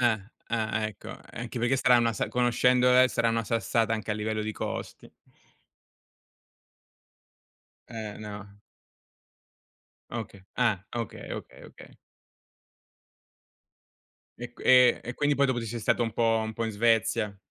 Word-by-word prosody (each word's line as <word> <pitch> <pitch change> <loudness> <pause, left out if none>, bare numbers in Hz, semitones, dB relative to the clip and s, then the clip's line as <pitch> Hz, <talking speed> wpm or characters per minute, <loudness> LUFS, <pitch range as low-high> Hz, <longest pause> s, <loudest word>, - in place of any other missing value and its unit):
Eh, 120 -2 +4 0.4
eh, 110 -1 -1
ecco, 110 - -10 0.2
anche 120 +1 -6
perché 120 +3 +2
sarà 125 -1 +5
una 115 -1 +2
sa - - -2
conoscendole 125 +1 +4
sarà 115 -2 +1
una 115 0 0
sassata 115 0 0
anche 110 -1 -3
a - - +1
livello 110 0 -2
di 110 +1 -3
costi. - - -6 2.8
Eh, 110 -3 -6
no. 105 -1 -9 1.5
Okay. 110 -4 -6
Ah, 110 -6 +1
okay, 115 -3 -5
okay, - - -8
okay. - - -15 2.4
E 120 +1 -7
q 120 - -19
e 125 -1 +6
e 120 - -5
quindi 145 0 +1
poi 140 - +4
dopo 130 -3 0
ti 115 - -5
sei 120 +2 -4
stato, 120 - +1
un 115 -2 -2
po' 115 -1 +2
un 110 - -4
po' 115 +1 -3
in 110 - -3
Svezia. 115 -1 +1
115 Hz, 135 wpm, -28 LUFS, 110-120 Hz, 2.8 s, e